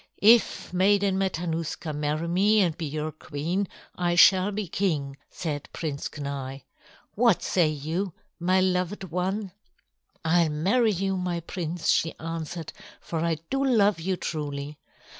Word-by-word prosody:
"If 225 -3 +4
Maiden 195 +1 +3
Matanuska 165 -3 -2
marry 150 +2 -1
me 200 +5 +3
and 175 -6 +2
be 165 -2 -4
your 155 +2 -3
queen, 160 +6 -3 0.3
I 175 -1 0
shall 190 +3 +6
be 205 -1 -3
king," 155 -7 -1
said 150 -4 -4
Prince 145 -4 -3
Kenai. 140 -2 -5 0.5
"What 230 -3 +3
say 175 -4 +3
you, 160 +6 -2 0.3
my 185 +2 +3
loved 185 +1 0
one?" 190 +3 -2 0.7
"I'll 165 0 +4
marry 200 +10 +2
you, 195 0 -1
my 180 -2 -2
prince," 170 -1 -3
she 165 - +2
answered, 165 0 -5 0.3
"for 165 - -4
I 165 0 0
do 270 0 +1
love 210 -8 +3
you 185 +3 -1
truly. 145 -2 -4
175 Hz, 140 wpm, -26 LUFS, 155-195 Hz, 0.7 s, shall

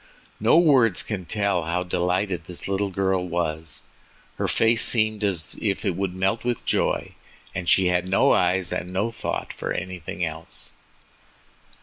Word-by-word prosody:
No - - +4
words 130 - +4
can 100 -5 -4
tell 100 -4 0
how 90 +2 -1
delighted 90 0 -1
the 90 0 -3
little 100 +1 0
girl 95 -1 0
was—her 80 -2 -5
face 115 +1 +3
seemed 110 -2 +2
as 90 -6 -1
if 100 0 -1
it 95 -4 0
would 95 -1 -2
melt 95 +5 0
with 120 -3 -2
joy, - - 0 0.4
and 90 -2 -3
she 95 - +5
had 90 0 +1
no 95 - +4
eyes 90 0 +2
and 90 +1 -4
no 100 +5 -1
thought 115 - -4
for - - -5
anything 90 -2 -4
else. - - -8
95 Hz, 150 wpm, -24 LUFS, 90-105 Hz, 0.4 s, she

